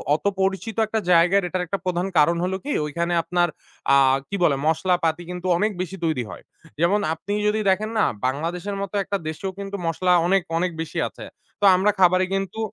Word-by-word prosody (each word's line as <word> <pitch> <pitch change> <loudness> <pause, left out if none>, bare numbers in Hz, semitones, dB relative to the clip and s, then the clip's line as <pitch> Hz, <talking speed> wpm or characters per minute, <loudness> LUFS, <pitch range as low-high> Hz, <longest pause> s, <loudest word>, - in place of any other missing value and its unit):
অত 160 - -7 0.2
পরিচিত 195 +3 -1
একটা 220 +1 -1
জায়গার 180 +3 +5
এটার 180 0 -2
একটা 195 +4 -2
প্রধান 180 +1 -1
কারণ 170 +3 +4
হল 185 +1 -1
কি? 290 - -4
ঐখানে 170 +3 -2
আপনার 175 -1 +1 0.5
আ - - +7 0.3
কি 200 - -3
বলে, 145 -5 +4
মশলা 180 +3 +2
পাতি 165 +2 0
কিন্তু 180 +1 -5
অনেক 215 +3 +1
বেশি 185 +1 -5
তৈরি 155 -7 0
হয়। - - -10 0.4
যেমন 180 +5 +3
আপনি 165 +5 -5
যদি 215 +1 +1
দেখেন 210 +3 +1
না - - +4 0.2
বাংলাদেশের 170 +9 -2
মত 200 - -4
একটা 200 - -2
দেশেও 175 +5 -4
কিন্তু 200 0 -5
মশলা 180 +2 +2
অনেক, 195 0 +3 0.2
অনেক 180 +1 0
বেশি 165 - -6
আছে। - - -10 0.4
তো - - +3
আমরা 200 +3 +3
খাবারে 185 0 +5
কিন্তু 195 +3 -3
185 Hz, 195 wpm, -23 LUFS, 170-195 Hz, 0.5 s, আ